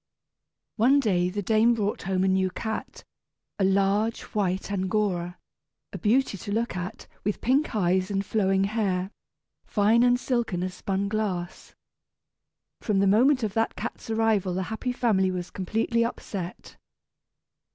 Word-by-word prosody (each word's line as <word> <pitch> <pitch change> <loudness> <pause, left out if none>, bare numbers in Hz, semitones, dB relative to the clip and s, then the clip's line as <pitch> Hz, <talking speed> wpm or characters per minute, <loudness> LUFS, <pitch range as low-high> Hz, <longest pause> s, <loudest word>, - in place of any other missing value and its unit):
One 255 +6 +5
day 180 -8 +1
the 205 +2 -3
dame 225 +3 +4
brought 210 -2 -2
home 185 0 0
a - - +2
new 190 0 +2
cat, 220 +4 -5 0.6
a - - +2
large, 200 +3 +2
white 195 -1 -1
Angora, 185 -2 -1 0.6
a - - -5
beauty 230 -2 +1
to 205 - -6
look 230 -1 -1
at, 180 +1 -5 0.2
with 205 +1 -1
pink 270 +2 +1
eyes 185 -1 +1
and 200 0 -1
flowing 195 -2 +1
hair, 195 -3 -1 0.5
fine 215 +3 +3
and 245 0 +4
silken 235 -9 -1
as 185 0 -3
spun 195 +1 -2
glass. 195 -4 -3 1.0
From 210 -3 0
the 195 - +3
moment 250 +7 +4
of 210 -3 -1
that 225 +1 0
cat's - - -6
arrival 220 -5 +1
the 190 - -1
happy 250 +3 -2
family 215 -6 +2
was 180 -1 -4
completely 225 +5 0
upset. 195 -6 -6
200 Hz, 145 wpm, -26 LUFS, 190-225 Hz, 1.0 s, One